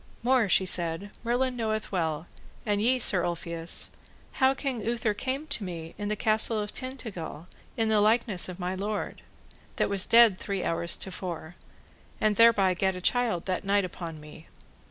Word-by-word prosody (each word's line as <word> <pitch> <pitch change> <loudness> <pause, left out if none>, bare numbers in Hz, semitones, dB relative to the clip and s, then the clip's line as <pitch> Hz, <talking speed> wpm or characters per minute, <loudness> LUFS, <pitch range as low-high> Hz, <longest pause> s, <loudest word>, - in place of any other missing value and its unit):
More, 245 -4 +3
she 190 - +4
said, 175 +2 0
Merlin 250 +2 0
knoweth 220 -2 -2
well, 160 -4 -1 0.4
and 205 -2 0
ye 250 +4 +3
Sir 195 -7 +4
Ulfius, 170 -1 -3 0.5
how 265 +1 +5
King 270 -4 -3
Uther 230 -1 0
came 260 +7 -3
to 285 -8 0
me 165 -3 -6
in 205 - -5
the 210 - 0
Castle 220 +1 +2
of 210 0 -4
Tintagil 215 - -7 0.3
in 225 -1 +1
the 215 -1 +3
likeness 215 -4 +2
of 180 0 -8
my 180 +1 -2
lord, 200 +2 -4 0.5
that - - 0
was 200 -2 +2
dead 230 -5 +6
three 200 -3 -3
hours 170 +1 +1
to 190 - -5
fore, 170 -3 -6 0.7
and 215 -1 +2
thereby 220 -5 +5
gat 190 +1 0
a - - -5
child 230 -4 +1
that 185 -1 -2
night 200 0 +2
upon 165 -3 -7
me. 150 +1 -13
205 Hz, 175 wpm, -28 LUFS, 180-230 Hz, 0.7 s, dead